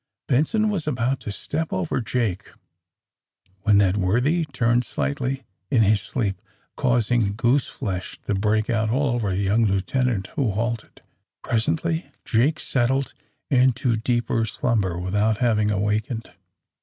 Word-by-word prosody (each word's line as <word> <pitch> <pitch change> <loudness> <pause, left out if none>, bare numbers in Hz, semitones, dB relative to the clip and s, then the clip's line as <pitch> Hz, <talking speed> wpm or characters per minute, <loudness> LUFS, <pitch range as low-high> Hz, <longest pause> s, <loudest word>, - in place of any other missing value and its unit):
Benson 185 - +2
was 170 -7 -2
about 130 -1 0
to 110 -4 -6
step 155 +10 -3
over 95 +6 -1
Jake 110 -5 -2 1.1
when 105 0 +4
that 100 -1 +3
worthy 125 - +2
turned 120 -4 +1
slightly 135 0 -2 0.3
in 115 -3 +4
his 105 -1 +3
sleep, 100 -7 -2 0.3
causing 120 -5 +1
*^gooseflesh" 120 -5 -1
to - - -1
break 105 +2 +1
out 110 -2 +1
all 135 +5 +1
over 120 -4 0
the 95 - -1
young 105 +4 +3
lieutenant, 100 +1 0
who 130 -9 +1
halted. 115 +2 -3 0.4
Presently 155 +6 0 0.2
Jake 135 +7 +2
settled 135 +2 0 0.4
into 125 -2 +3
deeper 115 0 0
slumber, 105 -6 0
without 105 +4 +1
having 110 -4 +2
awakened. 105 +3 -1
115 Hz, 130 wpm, -23 LUFS, 105-130 Hz, 1.1 s, when